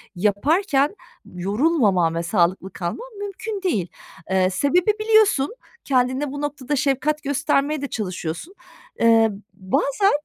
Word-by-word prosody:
yaparken 280 Hz, -, +1 dB, 0.3 s
yorulmamam 200 Hz, -, +1 dB
ve 170 Hz, -, -1 dB
sağlıklı 180 Hz, +1 st, 0 dB
kalmam 190 Hz, -, -5 dB
mümkün 405 Hz, +1 st, -5 dB
değil. 215 Hz, -, 0 dB, 0.4 s
Eee, 190 Hz, -1 st, +2 dB
sebebi 345 Hz, -, +2 dB
biliyorsun, 435 Hz, -, +3 dB, 0.3 s
kendine 260 Hz, +1 st, +1 dB
bu 285 Hz, +1 st, -5 dB
noktada 290 Hz, -1 st, -3 dB
şefkat 290 Hz, +2 st, 0 dB
göstermeye 285 Hz, +1 st, 0 dB
de 280 Hz, -, -2 dB
çalışıyorsun. 185 Hz, -, -5 dB, 0.5 s
Eee, 225 Hz, -1 st, +5 dB
b 195 Hz, -1 st, -14 dB
bazen 390 Hz, +9 st, +2 dB
270 Hz, 115 wpm, -22 LUFS, 195-305 Hz, 0.5 s, Eee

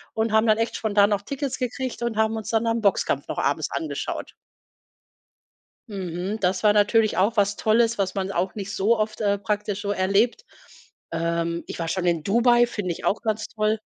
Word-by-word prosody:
und 220 Hz, 0 st, 0 dB
haben 220 Hz, +1 st, +3 dB
dann 215 Hz, -1 st, +4 dB
echt 230 Hz, +1 st, -1 dB
spontan 205 Hz, -1 st, +3 dB
noch 205 Hz, -1 st, +1 dB
Tickets 275 Hz, +5 st, -4 dB
gekriegt 255 Hz, 0 st, -3 dB
und 235 Hz, -2 st, -2 dB
haben 220 Hz, 0 st, +2 dB
uns 220 Hz, -, -6 dB
dann 225 Hz, 0 st, +1 dB
da 230 Hz, -, +1 dB
’n 230 Hz, 0 st, -1 dB
Boxkampf 200 Hz, -2 st, +1 dB
noch -, -, -5 dB
abends -, -, 0 dB
angeschaut. 320 Hz, -, -4 dB, 1.5 s
Mhm. 190 Hz, +1 st, -4 dB
Das 185 Hz, -1 st, 0 dB
war 210 Hz, -1 st, +5 dB
natürlich 210 Hz, +1 st, +3 dB
auch 210 Hz, +4 st, +2 dB
was 200 Hz, 0 st, +2 dB
Tolles, 230 Hz, +2 st, +2 dB
was 195 Hz, -2 st, -1 dB
man 195 Hz, 0 st, -2 dB
auch 185 Hz, +1 st, -1 dB
nicht 200 Hz, -2 st, -5 dB
so 220 Hz, +4 st, +2 dB
oft, 215 Hz, +1 st, -2 dB
äh, 200 Hz, -1 st, +2 dB
praktisch 205 Hz, 0 st, -2 dB
so 205 Hz, -, -2 dB
erlebt. 205 Hz, -, +1 dB, 0.7 s
Ähm, 170 Hz, 0 st, -1 dB
ich -, -, -7 dB
war 165 Hz, -, -2 dB
schon 180 Hz, +2 st, -2 dB
in 170 Hz, -3 st, +1 dB
Dubai, 240 Hz, +5 st, +4 dB
find 205 Hz, -6 st, -3 dB
ich 170 Hz, -, -6 dB
auch 205 Hz, -, +1 dB
ganz 220 Hz, -1 st, -2 dB
toll. 215 Hz, 0 st, 0 dB
210 Hz, 200 wpm, -24 LUFS, 195-225 Hz, 1.5 s, war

